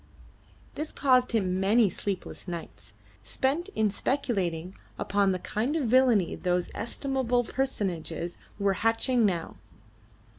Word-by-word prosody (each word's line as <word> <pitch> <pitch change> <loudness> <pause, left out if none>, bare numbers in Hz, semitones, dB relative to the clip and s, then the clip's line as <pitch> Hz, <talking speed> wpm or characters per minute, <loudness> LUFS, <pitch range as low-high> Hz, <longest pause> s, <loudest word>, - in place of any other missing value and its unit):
This 305 +1 -4
caused 255 -2 +3
him 185 -4 +1
many 210 +4 +4
sleepless 195 +1 -4
nights, 170 -2 -7 0.3
spent 300 +8 -1
in 215 -2 +2
speculating 190 - -1 0.2
upon 200 -1 +2
the 185 - 0
kind 225 - -2
of 320 - +1
villainy 245 -8 +4
those 180 -1 -1
estimable 250 +1 -1
personages 180 - -2 0.2
were 200 -1 +2
hatching 225 +1 +3
now. 170 -4 -3
215 Hz, 115 wpm, -28 LUFS, 185-255 Hz, 0.3 s, many